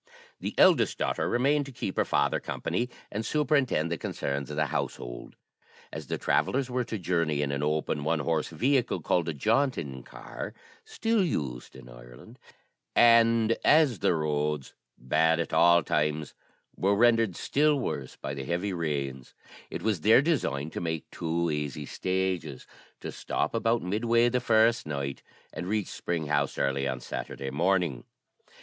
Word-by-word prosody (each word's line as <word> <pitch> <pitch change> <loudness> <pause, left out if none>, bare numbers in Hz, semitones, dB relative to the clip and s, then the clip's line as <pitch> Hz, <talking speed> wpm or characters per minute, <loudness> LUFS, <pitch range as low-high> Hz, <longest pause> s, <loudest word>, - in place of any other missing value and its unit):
The - - -5
eldest - - +5
daughter - - -1
remained 140 +4 +2
to - - -8
keep 120 -6 -4
her - - +1
father - - +1
company, 120 +1 -3 0.2
and 110 +2 -3
superintend 140 - +1
the 85 - -2
concerns 70 0 -3
of 75 - -5
the 75 0 +1
household. - - -5 0.6
As - - -7
the - - -2
travellers 130 -1 0
were 125 0 0
to 115 - -4
journey 85 -5 0
in 70 - -2
an 70 0 -2
open 75 0 -1
one 80 +1 0
horse 80 +1 0
vehicle, 130 -1 0
called 85 -2 +1
a - - -2
jaunting 95 - 0
car - - -8 0.3
(still 225 -3 0
used 70 - -3
in 65 -2 -12
Ireland), - - -14 0.6
and 115 -1 +5
as 145 - +4
the - - +2
roads, 75 -2 -1 0.2
bad 80 +6 +2
at 85 - -3
all 85 0 +5
times, 75 -1 -1 0.4
were 100 +2 +2
rendered 115 -3 +3
still 150 0 +2
worse 75 - -4
by 70 - -6
the 70 -1 -5
heavy 90 +8 -2
rains, 70 -6 -3 0.3
it - - -6
was 105 -7 0
their 110 - +6
design 80 - -1
to - - -5
make 80 -2 -4
two 85 0 -1
easy 75 -1 -3
stages 95 -5 -2 0.4
to - - -5
stop - - -2
about 115 0 +1
midway 115 +5 +2
the 125 +1 0
first 115 -3 +3
night, 70 -2 -4 0.3
and 85 - -5
reach 105 0 -1
Spring 85 -2 -3
House 70 -1 0
early 70 0 0
on 65 -1 -3
Saturday 70 - -6
evening. 85 -4 +1
85 Hz, 160 wpm, -28 LUFS, 75-115 Hz, 0.6 s, their